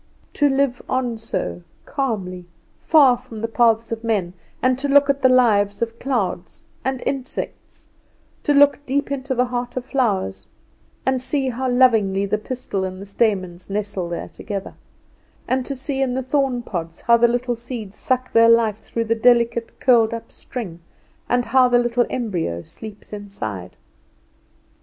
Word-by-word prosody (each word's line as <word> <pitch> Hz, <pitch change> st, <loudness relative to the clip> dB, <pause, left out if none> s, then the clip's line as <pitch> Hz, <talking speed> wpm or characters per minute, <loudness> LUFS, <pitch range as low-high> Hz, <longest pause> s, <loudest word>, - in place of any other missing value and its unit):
To 290 Hz, -1 st, +3 dB
live 270 Hz, -2 st, +1 dB
on 245 Hz, -3 st, -1 dB
so, 90 Hz, -, -3 dB, 0.2 s
calmly, 190 Hz, -10 st, -3 dB, 0.3 s
far 285 Hz, -6 st, +5 dB
from 235 Hz, -3 st, -10 dB
the 230 Hz, -, -1 dB
paths 230 Hz, -1 st, +2 dB
of 225 Hz, 0 st, -4 dB
men; 200 Hz, -6 st, 0 dB, 0.3 s
and 255 Hz, 0 st, +2 dB
to 285 Hz, -, -1 dB
look 285 Hz, 0 st, +5 dB
at 280 Hz, 0 st, -5 dB
the 260 Hz, -, +5 dB
lives 215 Hz, -5 st, +3 dB
of 230 Hz, 0 st, -5 dB
clouds 200 Hz, -9 st, -2 dB, 0.2 s
and 265 Hz, -1 st, -2 dB
insects; 270 Hz, -2 st, -5 dB, 0.5 s
to 295 Hz, -, +1 dB
look 285 Hz, 0 st, +5 dB
deep 280 Hz, +1 st, 0 dB
into 265 Hz, -1 st, -2 dB
the 250 Hz, +1 st, +2 dB
heart 245 Hz, 0 st, -4 dB
of 250 Hz, -, -3 dB
flowers, 195 Hz, -, -1 dB, 0.6 s
and 260 Hz, -1 st, +1 dB
see 265 Hz, 0 st, 0 dB
how 255 Hz, +1 st, -2 dB
lovingly 220 Hz, -6 st, +3 dB
the 210 Hz, +2 st, -1 dB
pistil 230 Hz, -4 st, -4 dB
and 185 Hz, 0 st, -4 dB
the 200 Hz, -, -8 dB
stamens 190 Hz, -4 st, -1 dB
nestle 200 Hz, -3 st, -2 dB
there 170 Hz, -, -5 dB
together; 200 Hz, -3 st, -6 dB, 0.7 s
and 255 Hz, -1 st, 0 dB
to 275 Hz, -, -3 dB
see 270 Hz, +1 st, -3 dB
in 255 Hz, -2 st, 0 dB
the 260 Hz, -, -1 dB
thorn 260 Hz, -2 st, 0 dB
pods 165 Hz, -6 st, -5 dB
how 235 Hz, -, +5 dB
the 235 Hz, 0 st, +5 dB
little 245 Hz, +1 st, -1 dB
seeds 230 Hz, -4 st, -7 dB
suck 255 Hz, 0 st, -1 dB
their 230 Hz, 0 st, +6 dB
life 230 Hz, -3 st, +4 dB
through 230 Hz, +1 st, -4 dB
the 225 Hz, -, +2 dB
delicate 235 Hz, 0 st, +2 dB
curled 230 Hz, -3 st, +4 dB
up 230 Hz, -, -9 dB
string, 200 Hz, -10 st, -7 dB, 0.5 s
and 245 Hz, 0 st, +2 dB
how 255 Hz, +2 st, +5 dB
the 245 Hz, 0 st, +4 dB
little 240 Hz, 0 st, +1 dB
embryo 175 Hz, -, -2 dB
sleeps 215 Hz, -1 st, -11 dB
inside! 110 Hz, -, -6 dB
235 Hz, 165 wpm, -21 LUFS, 205-255 Hz, 0.7 s, their